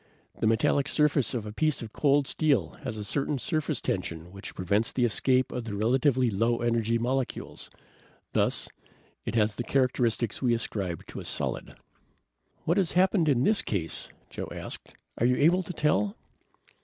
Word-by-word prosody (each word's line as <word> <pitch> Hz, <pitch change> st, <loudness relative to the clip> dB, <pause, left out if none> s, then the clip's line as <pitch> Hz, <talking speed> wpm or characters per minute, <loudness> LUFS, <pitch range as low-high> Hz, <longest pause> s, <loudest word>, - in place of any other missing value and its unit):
The -, -, +2 dB
metallic 115 Hz, +5 st, +2 dB
surface 150 Hz, -5 st, +2 dB
of 115 Hz, -3 st, -3 dB
a 105 Hz, -, -6 dB
piece 155 Hz, +2 st, 0 dB
of 110 Hz, -, -9 dB
cold 145 Hz, -1 st, +3 dB
steel 150 Hz, -1 st, +1 dB
has 110 Hz, -3 st, -4 dB
a 105 Hz, -, -4 dB
certain 140 Hz, +7 st, -1 dB
surface 155 Hz, 0 st, -1 dB
tension 85 Hz, -2 st, -3 dB
which 100 Hz, +1 st, -9 dB
prevents 100 Hz, +5 st, +1 dB
the 125 Hz, -, +1 dB
escape 130 Hz, +3 st, +2 dB
of 125 Hz, -, -3 dB
the 105 Hz, -3 st, -4 dB
relatively 125 Hz, +3 st, +2 dB
low 115 Hz, +4 st, +1 dB
energy 115 Hz, -1 st, +1 dB
molecules; 125 Hz, +2 st, -3 dB, 0.6 s
thus -, -, +1 dB, 0.6 s
it -, -, -3 dB
has 105 Hz, -1 st, +2 dB
the 120 Hz, -, -2 dB
characteristics 120 Hz, -4 st, +1 dB
we 120 Hz, -3 st, +3 dB
ascribe 95 Hz, -7 st, -4 dB
to -, -, -8 dB
a -, -, -8 dB
solid." -, -, -2 dB
"Then -, -, -15 dB, 0.9 s
what 170 Hz, +4 st, +2 dB
has 190 Hz, -4 st, +1 dB
happened 180 Hz, -2 st, +3 dB
in 130 Hz, -3 st, +3 dB
this 215 Hz, +5 st, +4 dB
case?" 85 Hz, -6 st, -4 dB, 0.2 s
Joe -, -, -5 dB
asked. -, -, -7 dB, 0.2 s
"Are 120 Hz, -, +3 dB
you 125 Hz, -, +3 dB
able 170 Hz, +7 st, +4 dB
to 180 Hz, -, -6 dB
tell?" 180 Hz, +6 st, +1 dB
125 Hz, 170 wpm, -28 LUFS, 110-145 Hz, 0.9 s, this